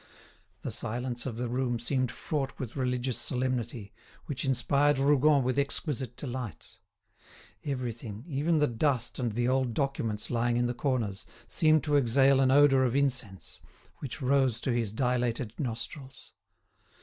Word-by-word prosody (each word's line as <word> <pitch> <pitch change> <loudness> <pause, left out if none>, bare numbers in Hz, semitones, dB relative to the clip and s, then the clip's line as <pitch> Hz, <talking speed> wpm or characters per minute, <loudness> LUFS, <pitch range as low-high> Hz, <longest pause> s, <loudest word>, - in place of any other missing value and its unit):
The - - -3
silence 120 +2 -4
of 115 -3 -5
the 125 +1 -2
room 120 0 -1
seemed 125 +1 -1
fraught 135 -1 -3
with 125 -4 -6
religious 125 -1 -1
solemnity, 125 -4 -2 0.3
which 130 -3 -3
inspired 140 +2 +2
Rougon 140 +1 +4
with 130 +2 0
exquisite 140 -3 -2
delight. 125 -5 -6 0.8
Everything, 120 -5 -4
even 155 +2 +1
the 150 - +4
dust 120 -1 0
and 120 -4 -1
the 120 +2 0
old 130 -3 +1
documents 115 -7 -1
lying 120 0 +1
in 120 - +2
the 120 - -1
corners, 120 -7 -2 0.2
seemed 155 +5 +3
to 150 -2 +3
exhale 135 +1 +4
an 135 -1 +4
odour 135 -1 +6
of 125 -1 +1
incense, 130 -9 -2 0.4
which 135 -1 -6
rose 130 -3 +2
to 130 - 0
his 115 -4 0
dilated 120 -1 0
nostrils. 130 +1 -6
130 Hz, 145 wpm, -29 LUFS, 120-140 Hz, 0.8 s, odour